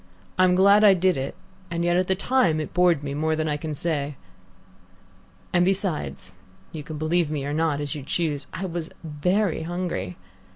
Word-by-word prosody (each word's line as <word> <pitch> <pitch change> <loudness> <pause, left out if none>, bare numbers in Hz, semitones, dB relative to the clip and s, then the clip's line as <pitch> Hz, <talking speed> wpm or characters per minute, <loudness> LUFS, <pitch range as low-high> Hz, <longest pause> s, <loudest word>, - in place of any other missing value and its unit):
I'm 185 -1 +5
glad 200 +3 +6
I 200 -2 +7
did 185 0 +2
it, 135 +1 -4 0.3
and 170 0 -2
yet 175 0 +2
at 180 0 +2
the 190 - +2
time 190 -7 +2
it 155 - -5
bored 175 -5 +3
me 140 -1 -3
more 155 +2 0
than 155 0 -1
I 150 - 0
can 150 +1 -4
say. 150 -2 -2 1.4
And 175 - +4
besides 185 - -2 0.4
you 155 - -6
can 150 +1 -7
believe 160 +1 +1
me 145 -3 -3
or 145 - -2
not 155 -2 +1
as 145 0 -2
you 150 - -6
choose 145 0 -2
I 190 - -4
was 170 -2 -4
very 175 +5 0
hungry. 165 - -4
165 Hz, 190 wpm, -24 LUFS, 150-180 Hz, 1.4 s, I